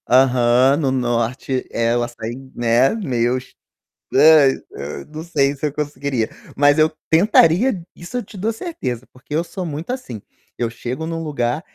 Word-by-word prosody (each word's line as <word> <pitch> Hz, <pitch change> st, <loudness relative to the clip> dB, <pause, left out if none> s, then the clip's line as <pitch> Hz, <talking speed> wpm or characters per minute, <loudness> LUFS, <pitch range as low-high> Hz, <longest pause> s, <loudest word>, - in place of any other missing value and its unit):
Aham. 125 Hz, +1 st, +4 dB
No 140 Hz, -4 st, 0 dB
norte 125 Hz, +1 st, -1 dB
ela 120 Hz, +1 st, +1 dB
sai, 115 Hz, -1 st, -6 dB, 0.2 s
né, 120 Hz, +2 st, +3 dB
meus 130 Hz, -, -1 dB, 0.6 s
nã 150 Hz, 0 st, +7 dB, 0.2 s
nã 70 Hz, +2 st, -7 dB
não 155 Hz, -, -5 dB
sei 145 Hz, -5 st, +1 dB
se 145 Hz, +2 st, -2 dB
eu 145 Hz, -, -5 dB
conseguiria, 140 Hz, -5 st, -2 dB, 0.3 s
mas 145 Hz, +2 st, +4 dB
eu 155 Hz, 0 st, +5 dB, 0.2 s
tentaria, 180 Hz, +4 st, +4 dB
isso 175 Hz, +8 st, -10 dB
eu 245 Hz, -, -2 dB
te 205 Hz, -, -13 dB
dou 220 Hz, +5 st, -1 dB
certeza 130 Hz, -, -5 dB
porque 135 Hz, +3 st, -8 dB
eu 165 Hz, -, +1 dB
sou 185 Hz, +1 st, -6 dB
muito 160 Hz, +6 st, -5 dB
assim, 130 Hz, -, -6 dB, 0.4 s
eu 120 Hz, -1 st, -1 dB
chego 120 Hz, +6 st, -5 dB
em 165 Hz, -, -4 dB
um 165 Hz, 0 st, -3 dB
lugar, 140 Hz, -3 st, -1 dB
135 Hz, 165 wpm, -20 LUFS, 120-160 Hz, 0.6 s, nã